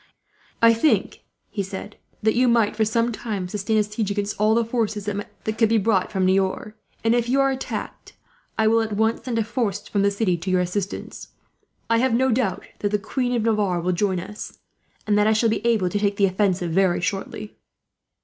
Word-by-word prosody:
"I 230 Hz, 0 st, +8 dB
think," 230 Hz, +7 st, +1 dB, 0.3 s
he 205 Hz, -, -2 dB
said, 195 Hz, +2 st, -7 dB, 0.3 s
"that 220 Hz, 0 st, +3 dB
you 250 Hz, +1 st, +3 dB
might, 230 Hz, -3 st, +3 dB
for 220 Hz, -, +2 dB
some 230 Hz, +2 st, +1 dB
time, 210 Hz, -5 st, -4 dB
sustain 210 Hz, +3 st, -1 dB
a 210 Hz, -, +4 dB
siege 210 Hz, 0 st, -3 dB
against 205 Hz, 0 st, -2 dB
all 215 Hz, +1 st, +4 dB
the 230 Hz, 0 st, +2 dB
forces 220 Hz, -3 st, -2 dB
that 210 Hz, +1 st, -5 dB
could 225 Hz, -2 st, +4 dB
be 225 Hz, -, +3 dB
brought 200 Hz, -3 st, +1 dB
from 190 Hz, -1 st, 0 dB
Niort; 190 Hz, +2 st, 0 dB, 0.3 s
and 225 Hz, +1 st, +3 dB
if 240 Hz, 0 st, +1 dB
you 270 Hz, +2 st, +2 dB
are 275 Hz, 0 st, +3 dB
attacked 265 Hz, 0 st, -6 dB, 0.4 s
I 220 Hz, -, +2 dB
will, 225 Hz, +1 st, +4 dB
at 220 Hz, -1 st, -3 dB
once, 220 Hz, +2 st, 0 dB
send 245 Hz, -3 st, -2 dB
a 225 Hz, -, +2 dB
force 220 Hz, -3 st, -2 dB
from 200 Hz, -, 0 dB
the 200 Hz, -, +4 dB
city 200 Hz, -3 st, 0 dB
to 180 Hz, +3 st, -5 dB
your 185 Hz, -1 st, +3 dB
assistance. 185 Hz, +2 st, -4 dB, 0.6 s
I 230 Hz, 0 st, +3 dB
have 255 Hz, -1 st, +2 dB
no 260 Hz, +2 st, +2 dB
doubt 225 Hz, -5 st, 0 dB, 0.2 s
that 205 Hz, -, 0 dB
the 210 Hz, -, +1 dB
Queen 250 Hz, +4 st, -2 dB
of 230 Hz, -, 0 dB
Navarre 210 Hz, -5 st, +1 dB
will 180 Hz, +2 st, 0 dB
join 185 Hz, 0 st, 0 dB
us, 210 Hz, +4 st, -8 dB, 0.5 s
and 210 Hz, -1 st, +2 dB
that 210 Hz, -, +3 dB
I 220 Hz, -, +4 dB
shall 225 Hz, +1 st, +2 dB
be 220 Hz, -, -1 dB
able 225 Hz, -6 st, +2 dB
to 205 Hz, -, -1 dB
take 200 Hz, -1 st, 0 dB
the 200 Hz, -, +4 dB
offensive, 185 Hz, -2 st, 0 dB
very 185 Hz, 0 st, +2 dB
shortly." 205 Hz, +2 st, -4 dB
210 Hz, 215 wpm, -23 LUFS, 195-230 Hz, 0.6 s, I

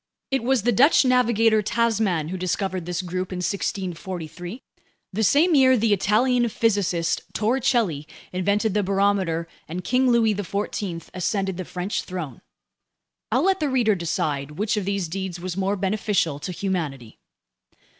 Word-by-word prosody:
It 270 Hz, -, +1 dB
was 255 Hz, -3 st, +2 dB
the 240 Hz, -, +3 dB
Dutch 270 Hz, +6 st, +5 dB
navigator 230 Hz, -3 st, +3 dB
Tasman 210 Hz, -7 st, 0 dB
who 185 Hz, -, -4 dB
discovered 185 Hz, 0 st, -2 dB
this 180 Hz, +1 st, -2 dB
group 185 Hz, +1 st, -4 dB
in 185 Hz, -, -4 dB
1643, 180 Hz, +1 st, -4 dB, 0.5 s
the 215 Hz, -, -1 dB
same 315 Hz, -, +4 dB
year 260 Hz, -3 st, +6 dB
the 220 Hz, -1 st, +2 dB
Italian 235 Hz, +5 st, +2 dB
physicist 195 Hz, -7 st, 0 dB
Torricelli 225 Hz, -, +1 dB, 0.3 s
invented 200 Hz, +3 st, +1 dB
the 210 Hz, -, +2 dB
barometer 195 Hz, -4 st, +1 dB, 0.2 s
and 180 Hz, +3 st, -5 dB
King 255 Hz, +1 st, +2 dB
Louis 230 Hz, -3 st, +4 dB
XIV 200 Hz, -3 st, -4 dB
ascended 190 Hz, 0 st, -1 dB
the 185 Hz, -, -4 dB
French 180 Hz, +4 st, -3 dB
throne. 170 Hz, -9 st, -6 dB, 0.9 s
I'll 255 Hz, +8 st, +2 dB
let 385 Hz, 0 st, +2 dB
the 300 Hz, -, 0 dB
reader 240 Hz, -5 st, +3 dB
decide 150 Hz, -5 st, -2 dB
which 210 Hz, +2 st, 0 dB
of 210 Hz, -3 st, -2 dB
these 200 Hz, -3 st, -1 dB
deeds 185 Hz, +1 st, -4 dB
was 180 Hz, 0 st, -4 dB
more 195 Hz, +1 st, 0 dB
beneficial 190 Hz, -6 st, 0 dB
to 180 Hz, -, -5 dB
humanity. 160 Hz, -, -4 dB
195 Hz, 145 wpm, -24 LUFS, 180-225 Hz, 0.9 s, year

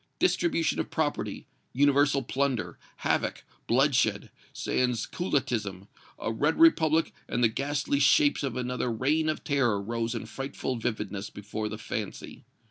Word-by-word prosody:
Distribution 170 Hz, -, +1 dB
of -, -, -2 dB
property, 145 Hz, -10 st, -2 dB, 0.3 s
universal 140 Hz, 0 st, +3 dB
plunder, 130 Hz, -2 st, -1 dB, 0.3 s
havoc, -, -, 0 dB, 0.2 s
bloodshed, 125 Hz, -5 st, +2 dB, 0.2 s
sans 125 Hz, -3 st, 0 dB
culottism, 110 Hz, -, -2 dB, 0.3 s
a -, -, -3 dB
red 150 Hz, +8 st, +1 dB
republic 165 Hz, -, +4 dB, 0.2 s
and 120 Hz, -, 0 dB
the -, -, +7 dB
ghastly 140 Hz, +4 st, -1 dB
shapes 145 Hz, +1 st, +4 dB
of 135 Hz, -5 st, -2 dB
another 125 Hz, -1 st, -2 dB
Reign 150 Hz, +7 st, +1 dB
of 155 Hz, -, -2 dB
Terror 130 Hz, -8 st, +1 dB
rose 115 Hz, +3 st, -2 dB
in 115 Hz, -, -4 dB
frightful 135 Hz, -1 st, -4 dB
vividness 105 Hz, -3 st, -3 dB
before 105 Hz, +1 st, -5 dB
the 105 Hz, -, -5 dB
fancy. 105 Hz, -1 st, -6 dB
125 Hz, 130 wpm, -28 LUFS, 110-145 Hz, 0.3 s, the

